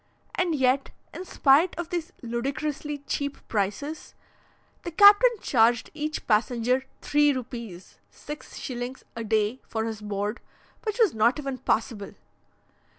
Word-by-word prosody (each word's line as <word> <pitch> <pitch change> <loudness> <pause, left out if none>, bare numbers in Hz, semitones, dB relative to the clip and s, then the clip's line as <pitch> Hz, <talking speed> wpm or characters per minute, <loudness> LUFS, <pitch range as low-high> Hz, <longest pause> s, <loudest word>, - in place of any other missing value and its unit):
and 350 -3 0
yet, 265 0 +2 0.2
in - - -6
spite 310 0 +3
of 345 -1 -4
these 345 0 -3
ludicrously 275 +5 -3
cheap 285 0 -2
prices, 225 +10 -3 0.7
the - - -5
captain 410 +7 +8
charged 230 -1 +3
each 305 0 -4
passenger 245 +3 +1 0.2
three 295 0 +3
rupees 235 -8 -7
(6s.) 260 -4 -7
a 230 - -4
day 220 +3 0
for 220 0 -2
his 220 -2 -5
board, 205 +1 -3 0.5
which 430 0 -2
was 450 -7 +4
not 225 +4 +3
even 275 -3 -4
passable! 220 -3 -1
260 Hz, 125 wpm, -26 LUFS, 225-300 Hz, 0.7 s, captain